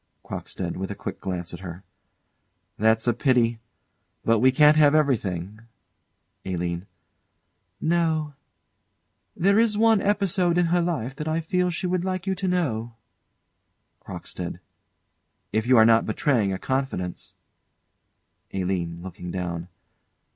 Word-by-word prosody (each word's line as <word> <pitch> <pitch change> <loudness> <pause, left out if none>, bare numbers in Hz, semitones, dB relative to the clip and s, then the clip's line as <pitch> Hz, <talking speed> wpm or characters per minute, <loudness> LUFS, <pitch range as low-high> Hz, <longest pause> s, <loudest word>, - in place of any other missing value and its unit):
CROCKSTEAD. 90 -3 -5
[With 95 +1 -4
a 100 - -4
quick - - -6
glance 90 -2 -4
at 85 - -7
her.] 90 0 -8 0.9
That's 110 +1 +2
a 120 - +3
pity. 120 -2 +2 0.7
But 115 -1 +4
we 130 +3 +5
can't 150 +3 +6
have 150 -1 +5
everything. 105 - 0 0.8
ALINE. 90 0 -3 0.9
No. 160 -2 +1 1.0
There 200 +4 +3
is 225 -2 +2
one 225 -2 +4
episode 190 -4 +1
in 175 - +4
her 175 - +4
life 135 -7 -2
that 150 - -4
I 160 +1 0
feel 180 +2 0
she 175 +1 -3
would 180 -1 0
like 185 -1 -2
you 190 - 0
to 190 0 -3
know 120 -11 -1 1.1
CROCKSTEAD. - - -7 0.9
If 110 +2 0
you 130 -1 +6
are 110 - +8
not 115 0 +4
betraying 110 -2 +1
a 95 - -2
confidence 130 -9 -3 1.2
ALINE. 90 -3 -2
[_Looking 90 -1 -7
down. 85 -2 -4
125 Hz, 130 wpm, -25 LUFS, -, 1.2 s, are